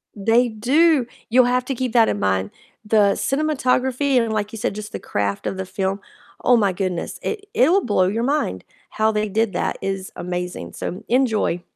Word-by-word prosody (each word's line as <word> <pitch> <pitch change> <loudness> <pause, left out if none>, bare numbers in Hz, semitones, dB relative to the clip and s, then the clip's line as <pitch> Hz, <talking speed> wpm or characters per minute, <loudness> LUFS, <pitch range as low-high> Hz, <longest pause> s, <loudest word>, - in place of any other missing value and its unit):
They 230 +4 +3
do, 265 +5 +3 0.2
you'll 250 +1 +5
have 250 0 +1
to 270 - -3
keep 250 -1 -3
that 230 -2 +5
in 100 - -1
mind, 95 0 0 0.3
the 210 -2 +4
cinematography 270 -2 0
and, 225 -2 -1
like 210 -1 -2
you 225 - -7
said, 210 - -1
just 210 0 -7
the - - -5
craft 100 -1 -2
of 190 - -2
the 190 - -3
film, 195 +1 -2 0.4
oh 245 -1 +5
my 200 -3 +2
goodness, 180 -2 -3
it 410 -1 -4
it'll 345 +10 +4
blow 185 -4 +2
your 225 +4 -1
mind. 245 - -1 0.3
How 220 0 +1
they 210 0 -1
did 220 -1 0
that - - -1
is 195 -1 -3
amazing, 180 0 -5
so 190 +5 -5
enjoy. 225 -8 +1
220 Hz, 190 wpm, -21 LUFS, 190-250 Hz, 0.4 s, you'll